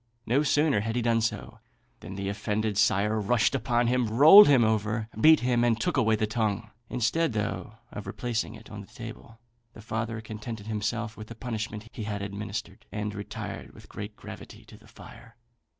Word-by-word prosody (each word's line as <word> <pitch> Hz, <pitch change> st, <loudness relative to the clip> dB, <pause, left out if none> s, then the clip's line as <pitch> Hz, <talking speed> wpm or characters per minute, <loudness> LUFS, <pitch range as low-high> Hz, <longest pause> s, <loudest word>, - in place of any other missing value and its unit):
No 130 Hz, +5 st, +2 dB
sooner 150 Hz, -4 st, +2 dB
had 110 Hz, +2 st, -3 dB
he 120 Hz, -, 0 dB
done 115 Hz, -1 st, +2 dB
so, 110 Hz, -, -3 dB, 0.4 s
than 95 Hz, -, -9 dB
the 100 Hz, 0 st, -4 dB
offended 105 Hz, +1 st, -2 dB
sire 105 Hz, +2 st, +2 dB
rushed 115 Hz, +5 st, +2 dB
upon 120 Hz, -2 st, +1 dB
him, 125 Hz, 0 st, +1 dB
rolled 150 Hz, -, +9 dB
him 135 Hz, -5 st, +5 dB
over, 110 Hz, 0 st, 0 dB
beat 155 Hz, +9 st, +6 dB
him, 120 Hz, -1 st, +2 dB
and 115 Hz, -1 st, +2 dB
took 115 Hz, -, -1 dB
away 110 Hz, 0 st, +3 dB
the 110 Hz, -, 0 dB
tongue. 105 Hz, -2 st, -2 dB, 0.2 s
Instead, 125 Hz, +5 st, 0 dB
though, 105 Hz, -2 st, -3 dB, 0.2 s
of 105 Hz, -, -7 dB
replacing 120 Hz, -2 st, -3 dB
it -, -, -14 dB
on -, -, -7 dB
the -, -, -13 dB
table, 110 Hz, -, -10 dB, 0.3 s
the -, -, -13 dB
father 110 Hz, 0 st, -3 dB
contented 110 Hz, 0 st, -7 dB
himself 110 Hz, +1 st, -3 dB
with 110 Hz, -1 st, -9 dB
the 115 Hz, -, -9 dB
punishment 115 Hz, -1 st, -5 dB
he 110 Hz, -, -6 dB
had 100 Hz, -1 st, -3 dB
administered, 100 Hz, +1 st, -6 dB
and 105 Hz, +1 st, -3 dB
retired 100 Hz, -1 st, -7 dB
with -, -, -15 dB
great 105 Hz, +1 st, -7 dB
gravity -, -, -11 dB
to -, -, -14 dB
the -, -, -18 dB
fire. 115 Hz, -1 st, -14 dB
110 Hz, 185 wpm, -27 LUFS, 105-120 Hz, 0.4 s, rolled